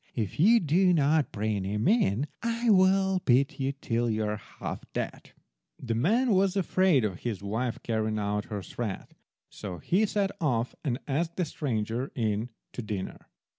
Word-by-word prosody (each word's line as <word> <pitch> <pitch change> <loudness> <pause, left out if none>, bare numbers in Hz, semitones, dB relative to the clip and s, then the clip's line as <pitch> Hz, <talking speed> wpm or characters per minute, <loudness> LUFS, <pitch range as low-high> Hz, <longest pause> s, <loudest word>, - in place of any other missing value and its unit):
If 110 -1 -3
you 225 +8 +6
do 180 +2 +3
not 150 -1 +2
bring 105 -1 -1
him 105 +3 -1
in 145 - +3 0.2
I 230 0 +1
will 190 0 +4
beat 140 +3 +2
you 135 0 0
till 120 -3 -1
you 110 0 0
are 105 0 -1
half - - -7
dead." - - -4 0.5
The 120 -3 -3
man 220 - +2
was 195 0 +3
afraid 185 - +3
of 95 -4 -3
his 110 -5 -4
wife 115 +4 -2
carrying 110 -1 -1
out 105 0 -1
her 105 -3 -5
threat, 110 -3 -5 0.4
so 95 -4 -6
he 205 - +1
set 200 -1 0
off 125 -6 0
and 125 -6 0
asked 160 +4 -1
the 180 - 0
stranger 125 -4 -2
in 110 -1 -1 0.2
to - - -4
dinner. 105 -4 -5
125 Hz, 170 wpm, -28 LUFS, -, 0.5 s, you